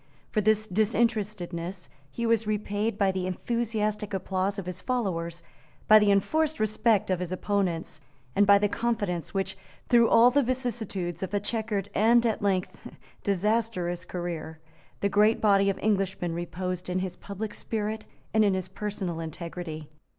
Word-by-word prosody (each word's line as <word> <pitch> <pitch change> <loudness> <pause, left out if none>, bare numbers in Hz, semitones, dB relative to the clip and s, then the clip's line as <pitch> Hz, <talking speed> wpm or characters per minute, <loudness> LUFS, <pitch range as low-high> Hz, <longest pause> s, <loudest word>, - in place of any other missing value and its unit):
For 215 - +1
this 215 +1 +3
disinterestedness 205 -4 -1 0.2
he 235 - -3
was 230 -1 +2
repaid 210 0 -1
by 200 -2 +3
the 185 -1 -2
enthusiastic 215 0 -1
applause 190 +1 -1
of 195 - -4
his 180 0 -5
followers, 170 -9 -2 0.4
by 215 0 +9
the 210 -1 +3
enforced 305 +10 +2
respect 215 -1 +2
of 185 - +1
his 180 -1 -4
opponents, 185 -3 -1 0.3
and 205 0 +4
by 200 0 +8
the 205 +1 +2
confidence 205 -7 -2
which, 195 0 -1 0.3
through 235 -2 +5
all 235 +2 +7
the 285 +3 +4
vicissitudes 225 - -2
of 190 +1 -3
a - - +3
chequered 205 -1 -2
and 235 +3 +4
at 225 -2 0
length 190 -2 0 0.5
disastrous 200 -3 0
career, 170 -3 -5 0.4
the 200 - +3
great 210 +2 +3
body 200 -2 +4
of 195 - -1
Englishmen 195 -4 0
reposed 180 +1 -4
in 180 - 0
his 185 -1 -3
public 205 +2 -6
spirit 215 0 -3 0.3
and 220 0 +5
in 200 -2 +3
his 185 -1 -3
personal 190 -4 -4
integrity. 165 -1 -6
200 Hz, 155 wpm, -27 LUFS, 180-220 Hz, 0.5 s, by